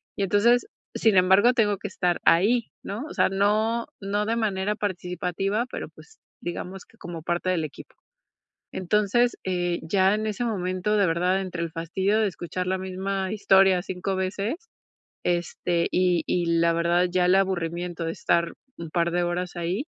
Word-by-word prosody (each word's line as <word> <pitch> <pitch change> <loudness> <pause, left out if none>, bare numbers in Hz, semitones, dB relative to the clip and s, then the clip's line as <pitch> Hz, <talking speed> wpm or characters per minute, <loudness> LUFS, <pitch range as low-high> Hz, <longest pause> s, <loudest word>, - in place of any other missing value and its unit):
Y - - -4
entonces, 230 - +3 0.3
sin 215 -4 +3
embargo, 190 +7 +5
tengo 205 -4 +2
que 210 - -5
estar 180 -2 -1
ahí, 220 +7 +4 0.2
¿no? 215 +9 -5
O - - -8
sea, - - +3
no 215 +4 +1
no 205 +1 -1
de 230 - +1
manera 210 -2 0
participativa, 190 +2 -2
pero, - - -5
pues, 445 - -18 0.2
digamos 180 +2 -6
que 225 - -25
como 170 -5 -7
parte 175 +1 -1
del 175 -3 +1
equipo. 155 - -9 0.8
Entonces, 210 +6 +1
eh, 175 -2 -1
ya 190 +4 +3
en 215 0 -3
ese 215 +3 -2
momento, 190 -1 -1
de 200 -2 +3
verdad, 180 +3 +1
entre 180 -3 -4
el 165 - -3
fastidio 190 +6 0
de 215 - +3
escuchar 180 0 -4
la 190 +1 0
misma 190 +1 -3
historia 195 -3 +4
5 190 +1 -3
veces, 195 - -2 0.7
este, 175 0 0
y 180 -3 +2
y 175 -1 +1
la 170 0 +4
verdad, 170 +2 +2
ya 180 -1 +2
el 180 +1 +4
aburrimiento 175 -2 -1
de 165 - -1
estar 170 0 0 0.2
un 165 -2 -7
par 170 0 0
de 175 0 +1
horas 175 +1 -2
ahí, 175 - -2
185 Hz, 170 wpm, -25 LUFS, 175-205 Hz, 0.8 s, embargo